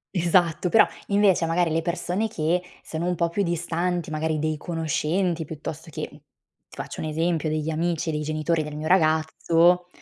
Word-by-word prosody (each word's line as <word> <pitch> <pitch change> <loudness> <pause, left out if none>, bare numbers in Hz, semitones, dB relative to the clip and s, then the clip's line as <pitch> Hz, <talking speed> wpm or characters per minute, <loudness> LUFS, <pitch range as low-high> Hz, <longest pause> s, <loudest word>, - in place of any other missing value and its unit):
Esatto, 175 -1 +2
però 215 +5 +6 0.2
invece 200 -4 +3
magari 165 0 +1
le 165 +1 +1
persone 175 +5 -1
che 170 -2 0 0.2
sono 165 +2 -3
un 180 - 0
po' 170 0 +1
più 200 +4 0
distanti, 175 0 -1
magari 155 0 -1
dei 155 0 -1
conoscenti 165 +2 -1
piuttosto 160 +2 -7
che, 155 0 -5
ti 145 - -17 0.5
faccio - - -7
un 155 - -3
esempio, 160 +1 0
degli 155 0 -1
amici 165 0 -1
dei 150 -1 -2
genitori 155 +2 0
del 150 -1 -6
mio 155 +1 -4
ragazzo, 165 +1 +3
165 Hz, 170 wpm, -25 LUFS, 155-175 Hz, 0.5 s, però